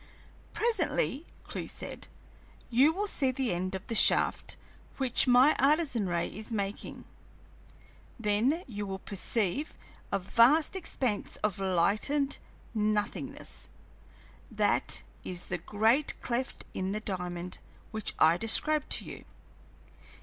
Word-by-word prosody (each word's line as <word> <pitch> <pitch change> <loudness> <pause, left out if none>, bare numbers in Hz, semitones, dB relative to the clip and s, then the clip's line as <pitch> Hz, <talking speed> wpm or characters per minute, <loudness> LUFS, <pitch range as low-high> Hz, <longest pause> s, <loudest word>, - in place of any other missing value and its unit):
"Presently," 355 - +1 0.2
Clewe - - -6
said, - - -6 0.6
"you 265 +6 +5
will 395 +5 -2
see 280 -9 +1
the 255 -5 -1
end 185 +2 -3
of 190 - -7
the - - -4
shaft - - +4 0.4
which 260 -1 +4
my 255 +4 +6
Artesian 275 - +2
ray 170 -1 -1
is 215 +3 -7
making; 200 -2 -4 1.1
then 230 - +1
you 205 -5 -5
will 190 0 -4
perceive 205 - -2 0.4
a 200 - +2
vast 235 - +4
expanse 255 - -2
of 210 -3 0
lighted 205 +10 +1 0.3
nothingness; 215 +6 -2 0.8
that - - +1 0.2
is 180 -1 -4
the 175 - -3
great 220 - +2
cleft 250 +2 -3
in 190 +1 -2
the 215 - -2
diamond 180 -3 -5 0.3
which 220 -2 -2
I 160 +2 +5
described 295 - +3
to - - 0
you. - - -9
220 Hz, 120 wpm, -30 LUFS, 195-275 Hz, 1.1 s, my